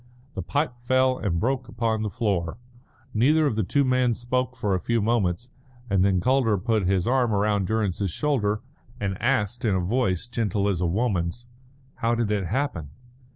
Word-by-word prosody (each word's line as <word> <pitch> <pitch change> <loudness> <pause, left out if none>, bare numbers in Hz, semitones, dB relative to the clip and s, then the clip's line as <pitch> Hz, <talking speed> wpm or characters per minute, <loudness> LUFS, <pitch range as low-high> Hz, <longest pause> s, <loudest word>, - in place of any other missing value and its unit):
The - - -4
pipe 140 -4 -2
fell 130 +1 +2
and 85 -5 -1
broke 130 +3 -1
upon 115 -2 -1
the 110 - -1
floor. 100 -7 -1 0.6
Neither 150 +8 +4
of 140 - +1
the 110 - +1
two 140 +9 +2
men 125 -2 +2
spoke 125 +1 -2
for 100 -2 -1
a 90 - +1
few 115 +6 0
moments, 110 -1 0 0.4
and 95 -2 +3
then 95 -2 +3
Calder 125 0 +2
put 105 -1 0
his 95 -2 +1
arm 125 -1 +2
round 100 -1 +1
Durrance's 105 -3 0
shoulder, 105 - 0 0.4
and 100 -2 -2
asked 120 -3 0
in 105 -5 +2
a - - +1
voice 95 -1 0
gentle 110 -4 -1
as 95 -4 0
a 90 - +2
woman's: 95 +1 -1 0.5
"How 115 +1 +1
did 115 -3 0
it 100 -4 0
happen?" 105 - -2
110 Hz, 180 wpm, -25 LUFS, 95-125 Hz, 0.6 s, Neither